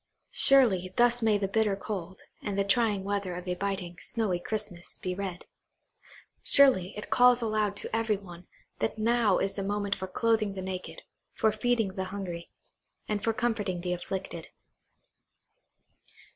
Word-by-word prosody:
Surely, 205 -10 +4
thus 240 0 +4
may 220 -2 +3
the 200 -1 -1
bitter 210 0 +1
cold, 190 -2 -6 0.2
and 200 -1 -3
the 200 - +3
trying 205 -1 +2
weather 200 -2 -2
of 180 +1 -7
a 180 - 0
biting, 185 -2 -3
snowy 210 -6 -1
Christmas, 205 -3 -3
be 185 - -3
read. 185 -2 -5 1.0
Surely, 230 -10 +5
it 210 0 -7
calls 245 +1 +6
aloud 215 -3 0
to - - -3
every 225 -2 +1
one, 175 -3 -12 0.3
that 220 - -1
now 225 -2 +3
is 195 - 0
the 200 - -4
moment 200 0 -1
for 190 - -5
clothing 215 0 +1
the 190 - -4
naked, 185 -1 -6 0.3
for 220 - +3
feeding 225 -1 +1
the 190 0 -4
hungry, 185 -3 -6 0.6
and 210 -1 -2
for 225 - +2
comforting 220 -6 -1
the 180 0 -1
afflicted. 180 -2 -5
200 Hz, 155 wpm, -29 LUFS, 185-220 Hz, 1.0 s, calls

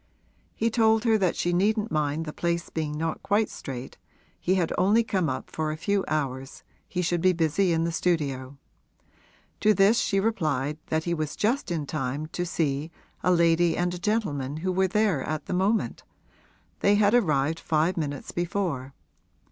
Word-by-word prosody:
He 230 +1 0
told 220 -1 +3
her 225 -2 +4
that 185 -3 +1
she 175 - 0
needn't 210 +4 +1
mind 150 +1 0
the 150 - -6
place 170 0 -2
being 150 -2 -3
not 160 +1 -2
quite 205 +2 +1
straight, 130 -1 -7 0.4
he 185 - +1
had 175 -4 0
only 205 +5 +4
come 190 -7 0
up 130 - -5
for 155 -1 -2
a 155 - -5
few 200 +4 0
hours 135 -3 -3 0.3
he 180 -1 -1
should 175 0 0
be 185 +1 +4
busy 170 +3 +1
in 165 0 +1
the 170 - 0
studio. 140 -6 -1 1.0
To 215 0 +4
this 200 +5 +5
she 195 - +1
replied 155 - -1
that 160 0 0
he 170 - -1
was 155 -3 -3
just 240 +5 0
in 165 -4 -2
time 140 0 -3
to 175 0 -3
see 150 -2 -1 0.3
a 180 - +2
lady 170 -1 +3
and 175 0 0
a 175 - -5
gentleman 155 - -1
who 185 - +1
were 190 +1 +2
there 200 -6 +1
at 155 +2 -3
the - - -4
moment 195 +5 0 0.8
they 200 +1 +4
had 205 0 +3
arrived 160 - +2
five 160 +3 +1
minutes 145 -4 -4
before. 170 -7 -2
170 Hz, 180 wpm, -26 LUFS, 150-195 Hz, 1.0 s, this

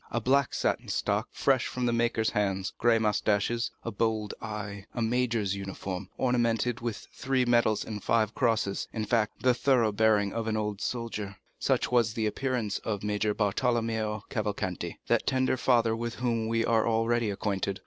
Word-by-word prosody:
A 120 - -1
black 135 +3 +2
satin - - 0
stock, - - 0
fresh 130 -3 +2
from 125 -1 -2
the 120 - +1
maker's 115 -1 +1
hands, 95 -2 -1
gray 120 -1 +4
moustaches, 110 +2 +1
a 115 - -3
bold 110 -1 -1
eye, 105 -2 -6
a 120 - -2
major's 115 -4 0
uniform, 95 -1 -5
ornamented 120 -1 +1
with 110 -5 -4
three 130 -1 0
medals 120 -3 +2
and 105 -2 -6
five 115 -1 +2
crosses—in 110 -3 0
fact, 110 0 0
the 125 -1 +5
thorough 125 -3 +3
bearing 105 -1 +2
of 115 -1 -3
an 110 -1 0
old 105 -1 -2
soldier—such 110 -5 -2
was 120 -2 +2
the 110 - 0
appearance 115 -2 -1
of 105 -3 -3
Major 105 0 0
Bartolomeo 110 0 0
Cavalcanti, 105 -5 -3
that - - +1
tender 130 -1 +2
father 120 -3 +2
with 115 0 -4
whom 115 -2 -1
we 115 0 +1
are 115 -1 +2
already 115 0 +1
acquainted. 100 -1 -2
110 Hz, 160 wpm, -29 LUFS, 105-120 Hz, -, the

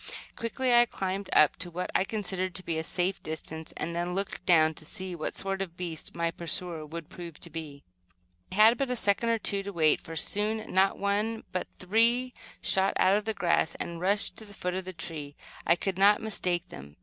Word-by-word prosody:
Quickly 245 +2 0
I 240 0 +7
climbed 195 -2 -3
up 150 - +5
to 175 +1 -3
what 180 +2 -4
I 190 - +3
considered 190 -3 -3
to 185 - -5
be 165 -1 -1
a - - -2
safe 180 +3 -1
distance, 160 0 -6
and 170 - -3
then 175 +1 -1
looked 195 0 -2
down 160 -3 +6
to 155 - -10
see 185 +4 -5
what 160 -3 -4
sort 195 0 -2
of 195 - -2
a - - -31
beast 170 -2 -6
my 170 0 0
pursuer 170 -1 -3
would 165 0 -7
prove 170 -3 -9
to 170 - -6
be. 150 -3 -7 0.7
I - - -5
had 220 +3 +7
but 275 -2 0
a 250 - 0
second 220 +1 +1
or 230 - +3
two 200 -2 0
to 200 +1 -6
wait, 160 -4 +3
for 165 - -8
soon, 210 +6 -1
not 190 +1 +4
one 210 +3 0
but 185 - -2
three 235 +6 +2 0.3
shot 195 +1 +3
out 190 +2 +5
of 210 +1 0
the 220 -1 -1
grass 170 -2 +1
and 170 0 -5
rushed 200 +3 +2
to 220 - -10
the 205 -1 -12
foot 180 -1 -2
of 185 0 -3
the 185 - -6
tree. 155 -4 -7 0.3
I 170 - +6
could 190 +1 -3
not 205 +2 +6
mistake 180 -5 0
them. 70 +2 -11
185 Hz, 220 wpm, -29 LUFS, 170-205 Hz, 0.7 s, I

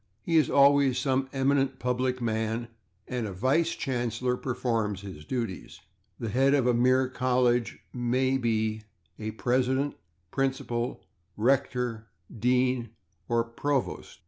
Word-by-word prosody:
He 165 - 0
is 155 - +4
always 140 -2 +5
some 130 -1 0
eminent 135 0 +1
public 125 0 -1
man, 110 +1 -1 0.4
and 125 -3 -2
a 100 - -6
/vice 145 - +1
chancellor/ 125 -1 -1
performs 115 -6 -1
his 95 -7 -9
duties. 115 -5 -4 0.4
The 115 - -3
head 135 +5 +3
of 135 -4 +2
a 125 - +4
mere 130 +2 +3
college 125 -2 +1 0.2
may 130 +2 +1
be 110 -2 0 0.4
a 110 0 -3
/president/, 130 +5 0 0.4
/principal/, 130 -3 -1 0.4
/rector/, 125 -1 +1 0.3
/dean/ 125 +1 +1 0.4
or 115 0 +1
/provost 135 +3 -2
125 Hz, 120 wpm, -28 LUFS, 115-130 Hz, 0.4 s, always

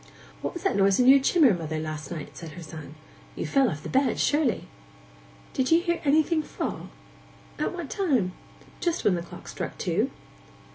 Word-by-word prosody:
'What - - -4
was 345 - -6
that 390 - +1
noise 195 +1 +4
in 250 - +4
your 275 +1 +9
chimmer, 275 - +5
mother, 160 -3 -3
last 155 -1 -5
night?' 160 -4 -7
said 165 -2 -8
her 175 - -9
son. 155 -2 -9 0.4
'You - - -3
fell 270 -2 +3
off 155 -4 -6
the - - -5
bed, 265 +1 +2
surely?' 290 -4 +1 0.9
'Did 260 -1 0
you 330 - +6
hear 340 -1 0
anything 310 +2 +3
fall? - - -5 0.7
At - - 0
what 345 -5 -6
time?' 260 - +1 0.5
'Just 345 -2 -1
when 200 - +5
the 175 - -1
clock 170 - -11
struck - - -5
two. - - 0
255 Hz, 185 wpm, -26 LUFS, -, 0.9 s, your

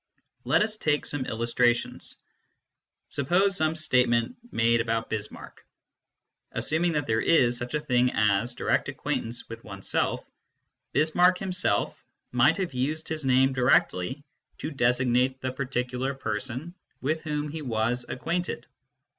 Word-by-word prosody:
Let - - +4
us 215 0 -2
take 150 -6 0
some 140 -3 -3
illustrations. 120 +1 0 0.9
Suppose 185 +8 +2
some 155 0 +1
state 130 -6 +3
ment 120 - +1 0.2
made 115 +1 +3
about 115 -1 -2
Bismarck. 105 -1 -6 0.9
Assuming 170 +2 0
that 150 -2 0
there 110 0 +1
is 125 -7 +4
such 120 +4 -3
a - - +1
thing 125 -4 +2
as 105 +3 +1
direct - - 0
acquaintance 115 +1 -3
with 115 - -9
oneself, 100 -2 -1 0.7
Bismarck 175 +5 +4
himself 180 - -1 0.3
might 125 +6 +4
have 185 -7 -2
used 150 +5 -2
his 155 -3 -3
name 130 +1 +4
directly 130 -1 +2 0.3
to 155 - -5
designate 125 0 +2
the 130 -1 -3
particular 130 0 -2
person 130 +7 -4 0.3
with 155 +4 -1
whom 150 -1 -3
he 155 +2 -5
was 120 -1 0
acquainted. 175 +7 -2
130 Hz, 130 wpm, -27 LUFS, 120-155 Hz, 0.9 s, Let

